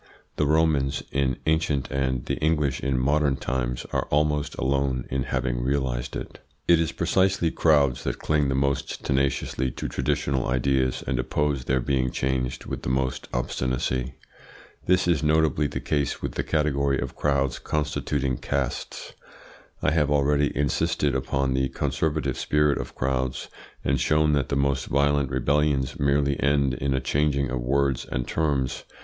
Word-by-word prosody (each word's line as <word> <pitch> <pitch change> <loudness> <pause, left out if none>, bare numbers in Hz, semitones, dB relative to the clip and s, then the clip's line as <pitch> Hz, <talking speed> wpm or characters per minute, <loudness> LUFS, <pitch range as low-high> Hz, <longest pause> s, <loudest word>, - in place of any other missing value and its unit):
The 75 - +2
Romans 75 -3 +2
in 65 -2 0
ancient 80 -4 0
and 65 -2 -1
the - - -2
English 75 -4 +1
in 70 -2 -1
modern 70 +2 +2
times 60 -2 -2
are - - 0
almost 75 0 +1
alone 65 -2 0
in 65 0 -1
having 60 -2 -1
realised 65 -2 -1
it. - - -7 0.3
It 85 -1 +6
is 80 -2 0
precisely 95 -3 +1
crowds 70 -6 +3
that - - -2
cling 75 -2 +1
the 65 - 0
most 70 0 -1
tenaciously 65 -1 0
to - - -4
traditional 65 +1 -1
ideas 65 0 +1
and 65 - -1
oppose 70 0 -1
their 65 0 +1
being 65 0 0
changed 65 -1 -2
with - - -5
the - - -3
most 65 0 -1
obstinacy. 65 +1 -2 0.7
This 90 0 +3
is 85 -5 +2
notably 75 -1 +2
the - - -4
case 70 -3 -1
with - - -3
the - - -2
category 70 -3 +1
of - - -4
crowds 70 -3 0
constituting 75 -3 -1
castes. 70 -3 -3 0.7
I 80 - +3
have 75 -2 +2
already 75 0 +2
insisted 75 +1 +1
upon 65 0 0
the 65 0 +1
conservative 75 -1 -1
spirit 75 -1 +2
of - - -6
crowds, 65 0 -2 0.4
and 70 -1 +2
shown 75 +3 +3
that 70 -2 0
the - - 0
most 70 -1 0
violent 70 0 +2
rebellions 70 +1 +1
merely 70 0 +2
end 70 -2 +2
in 65 +2 -1
a - - +1
changing 70 0 +1
of 65 -1 -2
words 70 +1 +1
and - - -2
terms. 70 -5 -1
70 Hz, 155 wpm, -25 LUFS, 65-75 Hz, 0.7 s, It